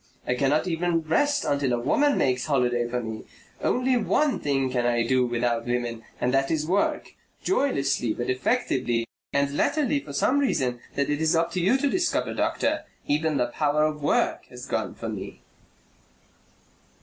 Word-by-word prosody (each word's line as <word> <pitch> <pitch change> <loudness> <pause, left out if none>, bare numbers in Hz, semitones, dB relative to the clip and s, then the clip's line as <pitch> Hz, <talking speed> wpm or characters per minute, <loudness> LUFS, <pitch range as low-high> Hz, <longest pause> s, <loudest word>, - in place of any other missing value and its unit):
I - - +1
cannot 140 +6 +1
even 170 0 0
rest 285 - +1
until 140 -3 +1
a 120 - +1
woman 285 - +2
makes 130 +1 +1
holiday 120 -4 +1
for 125 0 -2
me. 110 -1 -6 0.4
Only 255 0 +2
one 275 +5 +1
thing 135 -2 0
can 125 -1 0
I 120 -1 +1
do 125 0 +2
without 120 0 -1
women 120 -1 -2 0.2
and 125 +1 0
that 135 0 +2
is 155 -2 0
work, 190 +5 0 0.3
joylessly 140 - +1
but 120 +3 -3
effectively, 130 - 0 0.3
and 140 0 0
latterly 285 - +1
for 140 +1 -10
some 255 - +2
reason 130 - 0 0.2
that 140 +1 0
it 145 +1 -1
is 160 +1 +3
up 165 +1 +1
to 185 - -2
you 190 +9 +3
to 285 +1 +1
discover, 355 +5 0
doctor, - - 0 0.2
even 150 0 +1
the 120 -2 +1
power 150 0 +2
of 155 -1 -1
work 145 - +1
has - - -10
gone - - -2
from - - -5
me." - - -9
140 Hz, 175 wpm, -25 LUFS, 125-170 Hz, 0.4 s, is